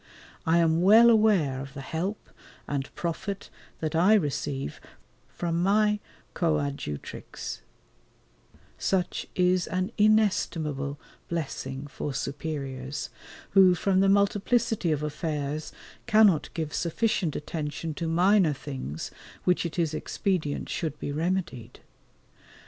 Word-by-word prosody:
I 165 +1 +4
am 165 0 +3
well 225 +5 +8
aware 195 - +3
of 135 +1 -9
the 140 - -5
help 175 +9 -4 0.4
and 140 -1 -3
profit 185 +4 -4 0.3
that 155 0 -2
I 185 +7 +6
receive 140 - -2 0.5
from 170 -1 -2
my 210 +2 +3 0.3
coadjutrix; 145 - -3 1.2
such 185 -2 0
is 180 0 +2
an 185 +3 -1
inestimable 165 -10 +2 0.3
blessing 140 -4 -4
for 145 0 -5
superiors, 140 -2 -4 0.4
who 185 -2 +7
from 190 +2 +2
the 195 0 +4
multiplicity 205 0 +2
of 150 -1 0
affairs 150 -1 -3 0.4
cannot 215 -8 +5
give 160 -2 -3
sufficient 180 -1 0
attention 155 +1 -4
to 165 +3 -3
minor 180 0 +4
things 130 - -6 0.3
which 180 -1 +2
it 165 - -9
is 165 -3 +1
expedient 165 -3 -1
should 155 -3 -3
be - - -4
remedied. 155 -7 -2
165 Hz, 110 wpm, -27 LUFS, 145-195 Hz, 1.2 s, well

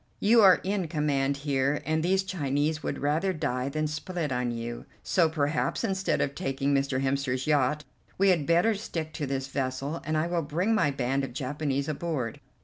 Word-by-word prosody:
You 225 +3 +5
are 190 -3 +7
in 190 -2 -1
command 140 -3 0
here, 140 +1 +1
and 160 +2 +1
these 190 +3 +2
Chinese 155 -4 -1
would - - -3
rather 160 +7 0
die 135 -5 -2
than 155 +2 -1
split 150 +1 -3
on 125 -1 0
you, 120 0 -5 0.2
so 170 -3 +3
perhaps, 145 - 0
instead 190 -3 0
of 140 - 0
taking 135 +1 -1
Mr. 135 -1 +1
Hemster's 135 -1 0
yacht, 150 0 +2 0.3
we 195 +1 +4
had 165 -6 +2
better 175 +7 +4
stick 165 -7 -5
to 150 -1 -3
this 135 0 -2
vessel, 135 +3 -3
and 155 +1 -1
I 155 - +1
will 170 0 0
bring 170 +9 0
my 165 -9 +3
band 135 0 -1
of 135 - -5
Japanese 140 +1 -2
aboard. 150 -6 -3
150 Hz, 185 wpm, -28 LUFS, 135-170 Hz, 0.3 s, are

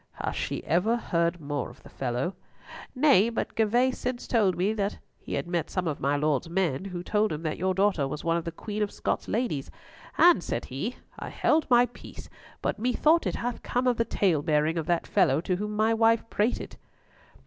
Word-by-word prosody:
"Hath - - -4
she - - -3
ever 205 +8 +2
heard 170 -5 0
more 145 -1 -3
of - - -17
the - - -13
fellow?" 130 +7 -2 0.6
"Nay, 255 -6 +5
but 230 - -3
Gervas 240 +4 +2
since 250 -1 -3
told 200 -7 +2
me 195 +5 +1
that 205 -2 -2 0.2
he - - -5
had - - -2
met 170 -2 -2
some 185 -2 -2
of 150 - -2
my 140 +1 +1
Lord's 150 +1 0
men 170 -3 0
who 180 -2 -5
told 210 +2 +1
him 155 +2 -4
that 155 -1 -3
your 185 +1 0
daughter 190 -7 +2
was 150 +2 -5
one 165 0 +1
of 170 - -1
the 170 - -4
Queen 210 +5 -5
of 210 - 0
Scots' - - -2
ladies, 215 - -2 0.5
and 345 - +6
said 115 - -3
he, 175 - -4 0.2
'I - - -6
held 310 0 +1
my 245 0 +6
peace; 245 - -12 0.3
but - - -1
methought, 300 +8 +3
It - - -2
hath 240 0 -3
come 245 +1 -1
of 245 -2 +2
the 230 - +3
talebearing 155 -4 +1
of 160 - -5
that 175 -1 +1
fellow 140 -2 +3
to 180 +1 -1
whom 210 +2 -4
my 220 +1 +3
wife 225 0 +3
prated.'" 215 +4 -1
190 Hz, 205 wpm, -27 LUFS, 160-230 Hz, 0.6 s, and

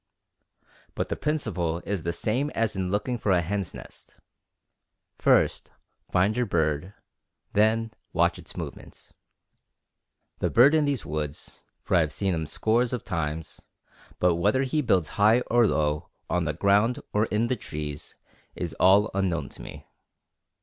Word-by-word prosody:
But - - -2
the - - -1
principle 90 - -2
is 100 -3 -2
the 85 - -2
same 125 +11 -1
as 110 -2 0
in 95 -1 -2
looking 105 +5 -1
for 105 - 0
a 90 -2 +4
hen's 100 +2 -3
nest, - - -13 1.0
first - - +3 0.4
find 95 +4 +2
your 125 -1 0
bird, 80 +1 -1 0.6
then 110 +2 +2 0.2
watch - - +2
its - - -10
movements. - - -9 1.3
The - - 0
bird 135 +6 +6
is 160 - +5
in 150 - +1
these 140 -5 -1
woods, 75 -1 -6 0.2
for - - -3
I 90 - +6
have 80 -2 +1
seen 95 +1 -1
him 80 -2 -2
scores 115 - +1
of 125 - -3
times, 80 -2 -4 0.6
but 90 -2 +2
whether 105 +9 +2
he 145 +3 0
builds 95 - +1
high 110 +4 +6
or 120 -2 +3
low, 75 -3 0 0.2
on 90 -1 +1
the 75 - -1
ground 100 +8 +2
or 105 +1 +3
in 110 +2 +1
the 130 +2 0
trees, 75 -8 -7 0.4
is 85 -3 -4
all 100 +3 +5
unknown 90 -7 -1
to - - -11
me. - - -10
100 Hz, 155 wpm, -26 LUFS, 85-115 Hz, 1.3 s, bird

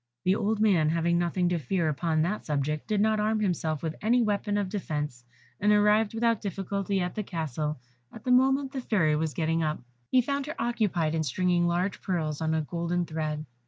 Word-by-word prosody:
The 185 +1 +3
old 215 +1 0
man 185 -8 +3
having 170 +1 +1
nothing 175 +1 +1
to 175 -1 0
fear 165 +4 0
upon 155 +1 +1
that 205 +6 -2
subject, 150 0 -2
did 215 -2 +1
not 215 0 +2
arm 215 +1 +1
himself 165 -6 -1
with 160 -1 -2
any 235 +4 +3
weapon 205 -1 0
of 205 -2 0
defence, 150 - -4 0.4
and 210 +1 +3
arrived 210 +1 +3
without 230 -1 +1
difficulty 195 0 -2
at 180 -1 -2
the 215 - -2
castle 155 -5 -3 0.3
at 225 - -12
the 250 - 0
moment 265 +2 +3
the 270 - -4
Fairy 170 -11 +2
was 155 -2 -2
getting 165 0 0
up. 155 -1 -1 0.3
He 255 - +5
found 280 +2 -2
her 310 - -5
occupied 205 -9 0
in 160 - 0
stringing 175 +4 +1
large 180 +3 -1
pearls 160 -5 -2
on 160 0 +1
a 160 - +1
golden 170 +2 -2
thread. 155 -1 -3
180 Hz, 200 wpm, -28 LUFS, 160-210 Hz, 0.4 s, He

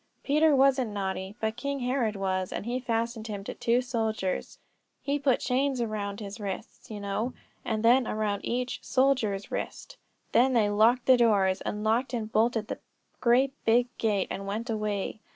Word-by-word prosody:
Peter 305 +1 +4
wasn't 265 -3 +3
naughty, 195 -1 -4
but 220 0 -1
King 280 +3 -3
Herod 245 -4 0
was; 185 -1 -1
and - - -4
he 245 +2 -1
fastened 230 -2 -2
him 205 -2 -5
to - - -5
two 235 +2 +1
soldiers; 220 -6 -2 0.5
he 285 +1 0
put 270 -3 +2
chains 265 +1 0
around 210 -3 -3
his 205 +1 -7
wrists, 200 -2 -6
you 215 -2 -6
know, 205 +5 -2 0.3
and 220 -2 -2
then 245 +1 +5
around 210 -2 -1
each 250 +1 -2
soldier's 250 -7 +1
wrist. - - -5 0.3
Then 260 +2 +4
they 215 -4 +3
locked 230 +4 +4
the 260 -1 +6
doors 200 -5 +3
and 210 0 -3
locked 240 +3 +1
and 220 -2 -4
bolted 225 0 +1
the - - -5 0.4
great 255 +3 +3
big 240 +2 +2
gate, 210 -4 +1
and 195 0 -5
went 225 +4 -3
away. 210 -1 -2
225 Hz, 170 wpm, -28 LUFS, 205-250 Hz, 0.5 s, the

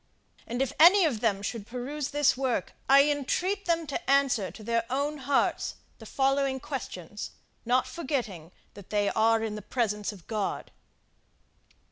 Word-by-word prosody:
And 245 +3 0
if 270 - -4
any 360 +4 +8
of 260 -9 0
them 205 -3 0
should 220 -1 -4
peruse 260 +4 -4
this 290 -1 +3
work, 255 -7 -1 0.2
I 275 +1 +8
entreat 355 +8 -1
them 335 -1 +1
to 290 +3 -5
answer 270 -8 +3
to 205 +6 -12
their 230 +1 0
own 285 +3 -1
hearts 275 +1 0 0.2
the - - -11
following 270 0 +1
questions, 210 - -6 0.4
not 250 +2 +2
forgetting 235 - -4 0.2
that 200 -2 -13
they 205 -1 +1
are 225 0 +3
in 220 -2 -2
the 210 - -6
presence 210 -1 -1
of 190 -5 -14
God. 215 -3 -3
255 Hz, 155 wpm, -28 LUFS, 210-280 Hz, 0.4 s, any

